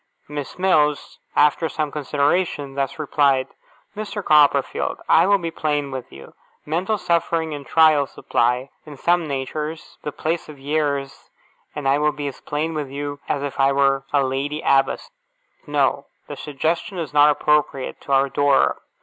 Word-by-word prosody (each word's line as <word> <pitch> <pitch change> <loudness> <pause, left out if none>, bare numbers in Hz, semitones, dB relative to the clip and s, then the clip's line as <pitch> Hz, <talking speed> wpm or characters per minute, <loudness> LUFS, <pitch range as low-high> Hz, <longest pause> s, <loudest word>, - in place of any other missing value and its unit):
Miss 145 -2 -6
Mills, 155 -6 +1 0.2
after 150 +2 +3
some 155 -2 -2
consideration, 145 0 0
thus 135 0 -2
replied: 140 -3 +2 0.5
'Mr. 210 -1 -5
Copperfield, 150 -2 +3
I 165 +3 +5
will 200 0 +5
be 170 -3 -4
plain 145 -3 -1
with 130 -2 -6
you. 70 0 -13 0.3
Mental 180 +8 -1
suffering 165 -3 0
and 145 -2 -8
trial 155 -3 +4
supply, 125 +2 -1
in 150 -2 -11
some 175 +2 +1
natures, 150 +3 -5
the 150 - -4
place 160 +3 -3
of 150 - -10
years, 140 -1 -2 0.5
and 145 -2 -3
I 140 +2 +3
will 150 0 +2
be 145 - -5
as 140 - -6
plain 155 +2 -2
with 150 -3 -4
you 145 +1 -5
as 145 - -1
if 140 -1 -5
I 135 0 +4
were 135 0 +2
a 140 -1 +3
Lady 140 +3 -2
Abbess. 135 - +2 0.6
No. - - +1 0.2
The - - -7
suggestion 165 +6 -2
is 160 -4 -4
not 145 0 +6
appropriate 150 -2 0
to - - -8
our 135 0 +4
Dora. 140 0 +2
145 Hz, 160 wpm, -22 LUFS, 140-155 Hz, 0.6 s, not